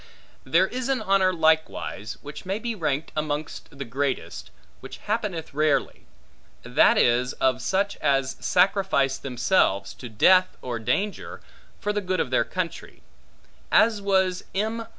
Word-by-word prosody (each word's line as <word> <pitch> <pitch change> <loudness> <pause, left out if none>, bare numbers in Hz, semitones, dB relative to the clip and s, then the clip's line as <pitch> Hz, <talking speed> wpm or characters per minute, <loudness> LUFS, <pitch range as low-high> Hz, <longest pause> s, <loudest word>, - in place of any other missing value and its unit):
There 165 +7 +3
is 255 +5 -4
an 270 -1 +1
honor, 190 -1 +2
likewise, 160 - 0
which 145 +1 -9
may 190 +2 -2
be 235 +1 -3
ranked 155 -6 -2
amongst 150 -1 -4
the 140 - -5
greatest, 135 +3 -3 0.3
which - - -10
happeneth 205 -8 -3
rarely; 150 0 0 0.6
that - - +4
is, 125 +2 +2
of 130 -1 0
such 200 +9 -1
as 135 -1 0
sacrifice 180 -8 +2
themselves 125 - +1
to 125 - -10
death 185 +12 +4
or 120 -2 -4
danger 195 - -2 0.4
for 210 -1 -2
the 205 - -1
good 185 -2 -2
of 125 - -1
their 125 - +3
country; 185 -2 -5 0.7
as 220 -2 +4
was 190 -2 +1
M. 220 +3 -2
165 Hz, 140 wpm, -25 LUFS, 135-195 Hz, 0.7 s, that